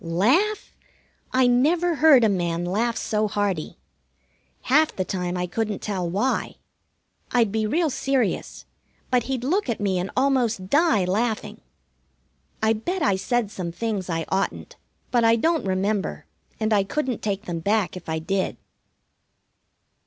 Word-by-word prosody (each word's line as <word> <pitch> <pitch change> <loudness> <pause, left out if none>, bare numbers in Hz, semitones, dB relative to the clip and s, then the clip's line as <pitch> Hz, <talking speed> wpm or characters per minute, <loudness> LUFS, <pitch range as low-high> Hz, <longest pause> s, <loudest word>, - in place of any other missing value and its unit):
Laugh? 255 - +1 0.6
I 255 0 +3
never 315 +8 +3
heard 290 -5 +6
a - - +5
man 175 -3 -1
laugh 220 +6 0
so 215 0 0
hearty. 200 -6 -2 0.9
Half 305 +4 +3
the 185 - -2
time 180 -1 -3
I 180 - -1
couldn't 210 +3 -2
tell 185 -4 -2
why. 210 +9 -1 0.8
I'd 235 -4 +2
be 215 0 0
real 320 +6 +1
serious, 265 -4 -1 0.5
but 250 -2 +2
he'd 260 -2 -3
look 345 +4 0
at 235 - -1
me 195 -3 0
and 180 +2 -3
almost 245 -8 +1
die 285 - +3
laughing. 215 +4 -2 1.0
I 220 0 +4
bet 345 - -3
I 200 - +3
said 230 +2 -1
some 175 -4 -4
things 205 -1 -3
I 165 -1 -1
oughtn't, 190 +1 -2 0.4
but 240 -2 +3
I 225 0 +5
don't 320 +5 +1
remember, 195 +2 -1 0.3
and 220 0 +1
I 200 -2 +4
couldn't 255 +4 -2
take 200 -1 -2
them 170 -1 -3
back 200 +2 0
if 180 -2 -9
I 160 - -1
did. 185 +4 -2
215 Hz, 150 wpm, -24 LUFS, 190-255 Hz, 1.0 s, heard